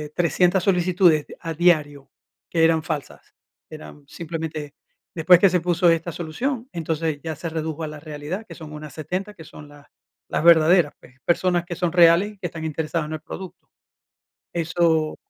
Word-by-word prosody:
300 180 +1 +2
solicitudes 180 -4 +3
de - - -12
a 165 -2 -5
diario 150 -5 +1 0.4
que 165 -1 +1
eran 160 -1 +4
falsas, 155 -4 -6 0.4
eran 110 - -11
simplemente 160 -3 -6 0.4
después 175 +2 +6
que 195 - +5
se 180 -2 +1
puso 175 0 +2
esta 165 +1 +1
solución, 230 - -4
entonces 160 -2 -2
ya 160 -2 -4
se 165 +2 -5
redujo 160 0 -4
a - - -3
la 150 0 -8
realidad, 155 +7 -6
que - - -10
son 155 -2 -10
unas 150 -2 -9
70, 185 +7 -4
que 165 - -13
son 150 0 -13
las 145 0 -17 0.4
las - - -2
verdaderas, 170 -1 +5
pues, 130 - -18
personas 175 0 +1
que 175 -1 -6
son 175 -1 -1
reales 175 +4 +5
y - - -22
que 175 - -3
están 160 -1 -7
interesadas 160 +1 -2
en 155 - -6
el 155 - -5
producto. 185 +3 -10 0.9
Eso 160 -1 +1
165 Hz, 175 wpm, -23 LUFS, 155-175 Hz, 0.9 s, después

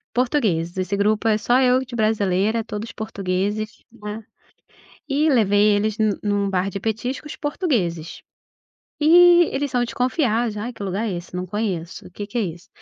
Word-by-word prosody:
Portugueses, 220 - 0
esse 185 +2 -1
grupo 215 +2 +1
é 215 -1 +3
só 240 +4 +2
eu 255 0 +4
de 245 -1 -8
brasileira, 215 0 +1
todos 220 +1 -6
portugueses, 205 0 -3
né. 210 -2 -7
Eh, 220 - -34 0.7
e 295 +2 +2
levei 210 -5 +4
eles 215 +1 -1
nu 215 -2 +1
num 205 -1 0
bar 190 +1 0
de 195 - -5
petiscos 245 +8 -3
portugueses. 225 - -2 0.8
Eh, - - 0 0.5
eles 280 +1 -1
são 245 -2 +2
desconfiados, 240 -3 0
"Ai, 225 +4 -4
que 220 - -10
lugar 200 +4 -2
é - - -2
esse? 175 +1 -9
Não 180 0 -3
conheço, 190 -4 -4
o - - -13
que 205 +3 -6
que 240 - -3
é - - +2
isso?". 175 +1 -6
215 Hz, 175 wpm, -22 LUFS, 195-240 Hz, 0.8 s, eu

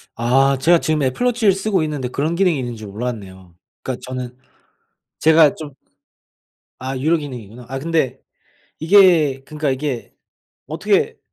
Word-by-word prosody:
아 135 +3 +2
제가 170 +4 +4
지금 150 +1 0
애플 130 - -1
워치를 230 -5 +3
쓰고 195 -3 0
있는데 145 -5 -3
그런 155 +6 -2
기능이 175 -6 +2
있는지 120 -4 -6
몰랐네요. 100 -5 -7 0.3
그니까 130 -1 -4
저는 125 -1 -6 0.8
제가 160 -2 +5
좀 145 -4 -9 1.1
아 130 0 -4
유료 160 +5 +2
기능이구나. 125 -5 -9
아 135 +1 -5
근데 140 -4 -1 0.6
이게 160 -6 +4
그니까 150 -2 -3
이게 130 -2 -4 0.5
어떻게 - - 0
135 Hz, 295 characters per minute, -19 LUFS, 125-160 Hz, 1.1 s, 제가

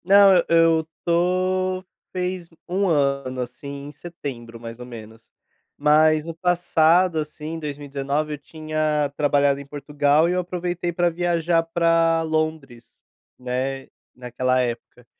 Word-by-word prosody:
Não, 200 +1 +7
eu 175 - +5
eu 165 -1 +4 0.2
tô 185 +2 +1 0.3
fez 180 -1 -3 0.2
1 195 +3 0
ano, 140 -5 0
assim, 140 +3 -7
em - - -8
setembro, 135 -7 -8
mais 115 0 -9
ou 125 - -8
menos. 115 -2 -12 0.5
Mas 155 +1 +4
no 165 - -5
passado, 175 0 +3
assim, 155 +1 -5
2019, 145 0 -3
eu - - -4
tinha 155 -1 -2
trabalhado 145 -1 +2
em 140 - -9
Portugal 145 +2 +1
e 175 - 0
eu 180 - +1
aproveitei 175 0 -3
para 175 +1 +1
viajar 170 -1 +1
pra 165 0 +2
Londres, 155 -6 -3 0.4
né, 130 +2 -3 0.3
naquela 125 +1 -1
época. 120 0 -4
155 Hz, 130 wpm, -23 LUFS, 140-170 Hz, 0.5 s, Não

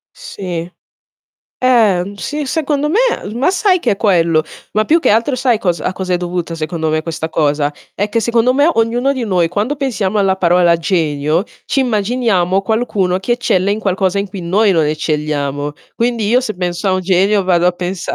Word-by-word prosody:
Sì. 175 -3 -6 0.9
Eh, 225 -8 +4
mhmm, 200 +1 -8
sì, 295 +8 -4
secondo 295 0 -1
me, 375 +9 +1 0.3
l 210 - -6
ma 265 +9 +2
sai 380 -1 +2
che - - +1
è - - -2
quello? 170 -6 +2 0.3
Ma 215 +1 +1
più 330 +7 +3
che - - +1
altro 230 +5 +2
sai 250 -3 +1
cosa 175 -5 -1
a - - 0
cosa 185 -1 -4
è - - +3
dovuta 175 -1 -4
secondo 160 0 -3
me 155 0 0
questa 160 0 -4
cosa? 150 -2 0 0.2
È 205 +2 -1
che 230 +2 0
secondo 235 +2 +2
me, 290 +4 +4
ognuno 240 +4 +1
di 255 -3 -3
noi, 180 -5 +1
quando 210 - -2
pensiamo 220 -7 -1
alla 195 -1 +2
parola 175 -1 +3
genio, 160 -1 0 0.2
ci 275 - +1
immaginiamo 210 -5 +1
qualcuno 200 -4 0
che 240 +5 -1
eccelle 200 -5 +1
in 210 - -2
qualcosa 190 -1 0
in 200 - -2
cui 190 0 -7
noi 200 +5 +2
non 160 -3 +2
eccelliamo. 150 -2 -2 0.2
Quindi, 235 -3 0
io 245 +3 +4
se 220 -4 -4
penso 180 +2 -2
a - - +2
un 185 - 0
genio 195 +3 +2
vado 175 -1 +2
a 180 - +3
pensa 180 +1 -4
195 Hz, 200 wpm, -16 LUFS, 175-230 Hz, 0.9 s, Eh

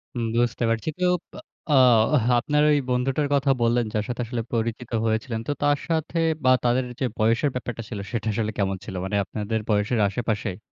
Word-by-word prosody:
হুম, 120 - -1
বুঝতে 120 0 +1
পারছি। 115 +6 -1
কেউ 180 0 +2 0.2
বা - - -9 0.3
আ - - +4 0.7
আপনার 150 +3 +1
ওই 145 - +4
বন্ধুটার 135 +4 0
কথা 140 -1 +3
বললেন, 120 0 +2
যার 105 -1 0
সাথে 120 0 -3
আসলে 120 0 -3
পরিচিত 115 +1 -2
হয়েছিলেন, 110 +1 -1
তো - - 0
তার 145 0 +3
সাথে 160 +1 -1 0.3
বা 130 - +5
তাদের 125 +1 +2 0.2
যে, 130 - +1
বয়সের 115 +6 +2
ব্যাপারটা 120 -2 -4
ছিল, 105 -4 -5
সেটা 115 -2 -3
আসলে 110 0 -1
কেমন 95 -1 0
ছিল? 95 - -7
মানে 100 - -2
আপনাদের 110 +2 -3
বয়সের 105 +2 +1
আশেপাশেই? 105 -3 -2
120 Hz, 185 wpm, -24 LUFS, 110-130 Hz, 0.7 s, বা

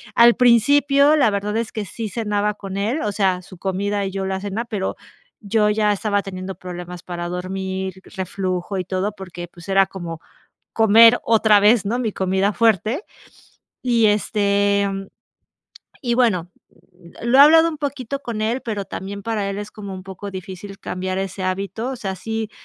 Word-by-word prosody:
Al 235 0 +7
principio, 280 +5 +5
la 270 -7 +4
verdad 205 +1 -2
es 230 -1 -2
que 215 -2 -4
sí 220 +2 -5
cenaba 210 -1 -1
con 195 -1 -7
él, 230 +10 -1
o 210 - -1
sea, 190 -3 +1
su 185 0 -14
comida 200 +2 -1
y 190 - -3
yo 195 0 -3
la 190 0 -2
cena, 205 +4 -4
pero 205 -4 -3 0.5
yo 210 0 +2
ya 210 0 +2
estaba 205 0 0
teniendo 190 -1 -6
problemas 180 -1 -8
para 175 -1 -5
dormir, 190 +1 -4 0.2
reflujo 185 0 -3
y 185 - -1
todo, 190 +3 -1
porque, 175 -3 -8
pues 175 +1 -15
era 195 0 +5
como 175 -4 -7 0.5
comer 225 +2 +7
otra 220 -2 +5
vez, 210 0 +4
¿no?, 235 +5 -1
mi 225 -4 -1
comida 190 +2 0
fuerte 225 - +2 0.8
y, 235 -3 +2
este, 200 -1 +2
mm, 195 0 -5 0.9
y 240 -5 0
bueno, 190 -9 +1 0.7
lo 235 +3 +3
he - - +10
hablado 325 +3 +8
un 310 - -5
poquito 280 -2 -4
con 230 -5 -5
él, 235 +4 0
pero 210 -4 -3
también 200 +1 -6
para 210 -2 -2
él 200 - -4
es 205 0 -6
como 200 -2 -8
un 185 - -8
poco 195 +1 -8
difícil 190 +1 -8
cambiar 185 +1 -3
ese 195 0 -4
hábito. 195 +6 -2
O 260 - -5
sea, 195 -4 -4
sí 220 +2 -4
200 Hz, 180 wpm, -21 LUFS, 190-225 Hz, 0.9 s, he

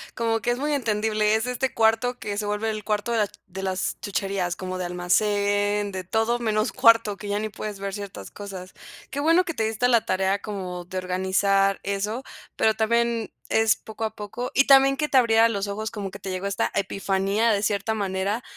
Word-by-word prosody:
como 225 -1 0
que 235 - -2
es 240 - -1
muy 295 +3 -1
entendible. 215 -4 +1
Es 220 +1 0
este 250 +1 -1
cuarto 225 +2 +2
que 205 -1 -5
se 210 - -2
vuelve 210 +2 -1
el 215 -1 -5
cuarto 210 +2 -1
de 230 - +1
la 210 - +2 0.2
de 190 +2 -8
las 190 -1 -1
chucherías, 195 -3 -2
como 185 0 -5
de 180 - -2
almacén 205 +3 +1
de 185 -1 -5
todo 225 +5 0
menos 215 -2 0
cuarto, 230 -3 +5
que 205 +1 -9
ya 205 - 0
ni 215 0 -3
puedes 210 -1 -6
ver 195 0 -4
ciertas 200 -1 -7
cosas. 190 -2 -8 0.4
Qué 280 - -3
bueno 330 +5 +4
que 335 - -4
te 225 - -1
diste 220 +2 0
a 245 - +4
la 235 -2 +3
tarea 190 +1 0
como 185 -4 -5
de 185 +1 -6
organizar 190 +2 +1
eso, 210 +5 -2 0.3
pero 220 - +3
también 235 +1 0 0.2
es 220 -1 +4
poco 220 0 -8
a 220 0 -2
poco 215 +4 -5
y 275 - +4
también 275 0 +6
que 300 - 0
te 270 - +3
abriera 230 -2 +5
los 200 -2 -2
ojos 215 +2 -3
como 200 -3 -5
que 195 - -9
te 190 - -6
llegó 185 +2 -3
esta 200 - 0
epifanía 195 +3 0
de 205 -1 +1
cierta 210 +1 0
manera 200 +2 -2
210 Hz, 215 wpm, -25 LUFS, 195-225 Hz, 0.4 s, también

